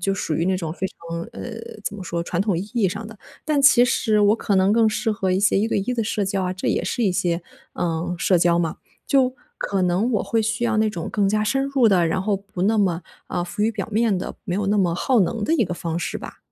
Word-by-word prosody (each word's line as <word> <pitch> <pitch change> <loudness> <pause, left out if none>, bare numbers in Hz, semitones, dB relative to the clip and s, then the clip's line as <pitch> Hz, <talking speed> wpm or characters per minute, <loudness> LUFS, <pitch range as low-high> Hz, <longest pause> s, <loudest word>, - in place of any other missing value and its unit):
就 195 +2 0
属 165 -5 -2
于 165 +3 0
那 190 0 +2
种 165 -3 -4
非 190 +2 -3
常 170 -2 -7
呃， 240 - -7 0.3
怎 205 - -3
么 200 - -7
说 170 -1 -3
传 170 +1 -2
统 195 -3 +1
意 175 - -2
义 225 -6 +2
上 205 +4 -5
的。 220 -2 -12 0.3
但 300 -3 +1
其 260 -3 +7
实 220 -3 +1
我 205 +1 +5
可 205 -3 0
能 190 +2 +4
更 225 -1 +4
适 220 +1 0
合 190 -2 -1
一 185 - +2
些 195 0 +3
一 220 +3 +1
对 - - +1
一 205 +6 -1
的 235 - 0
社 210 -1 -1
交 195 0 -1
啊， 180 0 -2
这 185 - -5
也 - - +1
是 245 - -2
一 190 - +2
些， 175 -2 0 0.3
呃， 170 +1 -2
社 180 +1 +2
交 170 0 +3
嘛。 165 -2 -1 0.3
就 260 -2 +3 0.2
可 195 -2 -1
能 180 +7 +1
我 215 - +1
会 230 - 0
需 225 +2 -1
要 225 -2 +1
那 220 0 +3
种 170 -5 -5
更 200 -2 +1
加 215 +1 +1
深 270 +5 +1
入 275 -4 +3
的， 180 -5 +4
然 185 - 0
后 205 +1 0
不 195 -2 -6
那 220 +3 +3
么， 180 -4 +1 0.3
呃， 175 - -2
浮 180 - -7
于 225 - +3
表 210 -4 -4
面 220 -2 +2
的， - - -5
没 180 - -3
有 205 - -1
那 205 +2 +2
么 180 -3 +2
耗 250 +1 +2
能 210 +3 0
的 - - 0
一 235 - +3
个 175 - -4
方 165 -1 -4
式 - - -3
吧。 - - -10
200 Hz, 295 characters per minute, -22 LUFS, 180-220 Hz, 0.3 s, 其